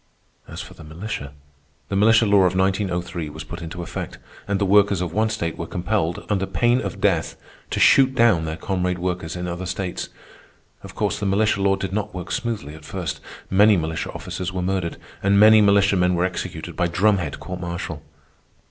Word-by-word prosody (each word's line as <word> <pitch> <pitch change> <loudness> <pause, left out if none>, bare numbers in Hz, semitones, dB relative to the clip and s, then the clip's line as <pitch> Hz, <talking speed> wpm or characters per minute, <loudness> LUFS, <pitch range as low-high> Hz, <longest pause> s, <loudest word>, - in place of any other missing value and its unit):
As - - -7
for - - -10
the 80 - -13
militia, 80 -2 -6 0.6
the 100 - -2
militia 110 +3 +5
law 100 -2 +5
of 90 0 +1
1903 95 -4 -1
was 80 +1 -8
put 80 +2 -8
into 85 +1 -6
effect, - - -6 0.3
and 100 -1 0
the 100 - +1
workers 100 -1 +4
of 90 -2 -3
one 110 +2 +2
state 85 -6 -3
were 85 - -4
compelled, 90 -2 -2
under 95 -2 0
pain 120 +1 +2
of 95 - -5
death, - - +1 0.3
to - - -2
shoot 135 -1 +5
down 110 -9 +4
their 80 0 -4
comrade 90 0 -1
workers 90 -2 -3
in 90 0 -4
other 90 +1 -4
states. 90 0 -4 0.7
Of - - -11
course, - - -1
the 105 - -1
militia 100 +1 +2
law 95 0 +3
did 95 -1 -5
not 105 -1 -3
work 90 -2 -6
smoothly 110 -11 -3
at 80 -1 -12
first. 90 +1 -4 0.3
Many 105 +2 +6
militia 80 -1 -3
officers 90 0 -5
were 90 -1 -3
murdered, 90 -2 -2 0.2
and 100 +1 +3
many 110 +1 +8
militiamen 100 -3 +4
were 90 +1 +1
executed 95 - -5
by 90 - +1
drumhead 95 +1 +1
court 90 -1 -6
martial. 85 -3 -5
95 Hz, 190 wpm, -22 LUFS, 85-100 Hz, 0.7 s, many